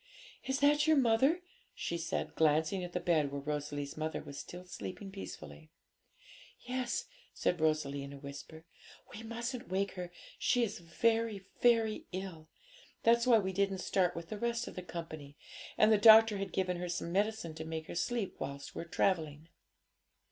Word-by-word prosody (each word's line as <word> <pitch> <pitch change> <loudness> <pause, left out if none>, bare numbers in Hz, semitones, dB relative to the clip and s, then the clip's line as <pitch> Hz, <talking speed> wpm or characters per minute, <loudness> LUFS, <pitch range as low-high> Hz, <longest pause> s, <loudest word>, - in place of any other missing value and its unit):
'Is 265 +1 -1
that 295 +1 +4
your 315 -1 +5
mother?' 270 +8 +3 0.3
she 170 - -3
said, 165 -1 -2
glancing 160 +4 +2
at 175 - -5
the 180 - -1
bed 155 -5 +2
where 140 - -3
Rosalie's 145 0 -3
mother 155 +1 -2
was 140 - -8
still 180 +1 -8
sleeping 180 - -7
peacefully. 75 - -9 0.9
'Yes,' 250 0 -2 0.3
said 175 -3 0
Rosalie 155 -3 +1
in 140 0 -7
a 140 - -9
whisper; 140 +3 -9 0.5
'we 215 - -7
mustn't 235 +1 -5
wake 195 +1 0
her, 180 -1 -6 0.3
she 245 - +3
is 220 - -2
very, 220 +4 0 0.2
very 225 -3 +3
ill. 180 -4 -6 0.5
That's 235 +1 +4
why 235 -2 +7
we 190 -3 -1
didn't 195 0 +1
start 185 -1 +1
with 170 -1 -7
the 215 - -5
rest 235 +1 -1
of - - -7
the 185 - -5
company; 155 -5 -8 0.4
and 215 - +6
the 215 - +5
doctor 220 -1 +8
has 195 -1 -3
given 180 -2 -1
her 175 0 -4
some 170 0 -3
medicine 205 -3 0
to 160 0 -6
make 160 0 -5
her - - -7
sleep 215 +3 -2
whilst 140 +1 -6
we're - - -5
travelling.' 160 -3 0
180 Hz, 170 wpm, -33 LUFS, 155-225 Hz, 0.9 s, doctor